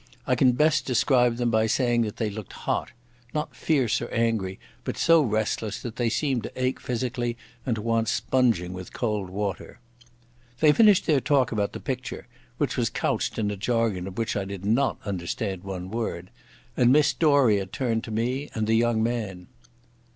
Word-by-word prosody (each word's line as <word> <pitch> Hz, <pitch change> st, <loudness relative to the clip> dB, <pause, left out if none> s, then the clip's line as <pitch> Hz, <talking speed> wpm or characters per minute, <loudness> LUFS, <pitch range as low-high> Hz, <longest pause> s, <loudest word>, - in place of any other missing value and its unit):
I 130 Hz, -, +2 dB
can 125 Hz, 0 st, +4 dB
best 155 Hz, +4 st, +2 dB
describe 125 Hz, -1 st, +3 dB
them 120 Hz, -1 st, 0 dB
by 110 Hz, 0 st, +3 dB
saying 120 Hz, 0 st, +2 dB
that 105 Hz, -2 st, -3 dB
they 110 Hz, -3 st, -1 dB
looked 105 Hz, -1 st, -8 dB
hot—not 120 Hz, +4 st, -4 dB
fierce 135 Hz, -8 st, +1 dB
or 120 Hz, -, -4 dB
angry, 115 Hz, -5 st, -1 dB, 0.2 s
but -, -, -4 dB
so 165 Hz, -1 st, +5 dB
restless 110 Hz, -3 st, -1 dB
that 120 Hz, -2 st, -6 dB
they 120 Hz, -2 st, +1 dB
seemed 125 Hz, +2 st, 0 dB
to -, -, -6 dB
ache 130 Hz, 0 st, 0 dB
physically 120 Hz, -1 st, -2 dB, 0.3 s
and 120 Hz, -, +1 dB
to 105 Hz, -, -5 dB
want 115 Hz, -1 st, +1 dB
sponging 115 Hz, -8 st, +1 dB
with 95 Hz, 0 st, -8 dB
cold 105 Hz, -5 st, -2 dB
water. 100 Hz, +2 st, -4 dB, 0.8 s
They 155 Hz, -1 st, +6 dB
finished 210 Hz, +2 st, +5 dB
their 150 Hz, -5 st, +3 dB
talk 135 Hz, -2 st, +2 dB
about 105 Hz, -3 st, -1 dB
the -, -, -6 dB
picture—which 130 Hz, -2 st, -5 dB
was -, -, +1 dB
couched -, -, -1 dB
in 105 Hz, -2 st, 0 dB
a -, -, -3 dB
jargon 105 Hz, -3 st, 0 dB
of 95 Hz, -, -9 dB
which 115 Hz, -1 st, -1 dB
I 100 Hz, -, 0 dB
did 100 Hz, 0 st, -7 dB
not 120 Hz, +4 st, +2 dB
understand 95 Hz, 0 st, -3 dB
one 95 Hz, -1 st, -6 dB
word—and 115 Hz, +3 st, -2 dB
Miss 150 Hz, +1 st, +4 dB
Doria 130 Hz, -, +3 dB
turned 115 Hz, +2 st, -1 dB
to -, -, -9 dB
me 125 Hz, +6 st, -1 dB
and 110 Hz, -1 st, 0 dB
the 110 Hz, -, +1 dB
young 115 Hz, -1 st, +2 dB
man. 105 Hz, -7 st, -3 dB
115 Hz, 175 wpm, -26 LUFS, 105-125 Hz, 0.8 s, They